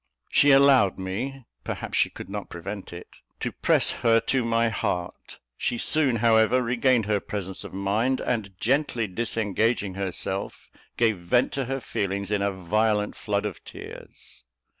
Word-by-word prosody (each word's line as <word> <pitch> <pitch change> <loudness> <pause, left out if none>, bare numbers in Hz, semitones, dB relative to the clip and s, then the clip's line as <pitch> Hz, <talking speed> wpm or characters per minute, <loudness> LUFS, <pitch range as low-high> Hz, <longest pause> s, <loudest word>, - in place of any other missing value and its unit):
She 145 - +5
allowed 135 -7 +6
me 115 +8 -4 0.2
perhaps - - -5
she - - +3
could - - -9
not 100 +1 -6
prevent 100 +3 -7
it 85 0 -9 0.3
to - - -2
press - - +2
her 115 -1 +5
to 130 -2 0
my 115 0 +2
heart. 90 -6 -4 0.2
She 120 - -1
soon, 140 -2 +2
however, 115 +2 +4
regained 120 -1 +2
her 105 -1 +1
presence 95 -2 -5
of - - -9
mind, 105 +7 0
and, 100 -6 -3
gently 125 0 +1
disengaging 110 0 -1
herself, 95 0 -4 0.3
gave 110 -5 +2
vent 90 +9 +2
to 135 -2 -2
her 135 +2 -2
feelings 100 -4 -3
in 105 -1 +1
a 100 0 +1
violent 105 +3 0
flood 105 -1 -2
of 100 -4 -5
tears. - - -11
110 Hz, 155 wpm, -25 LUFS, 100-120 Hz, 0.3 s, allowed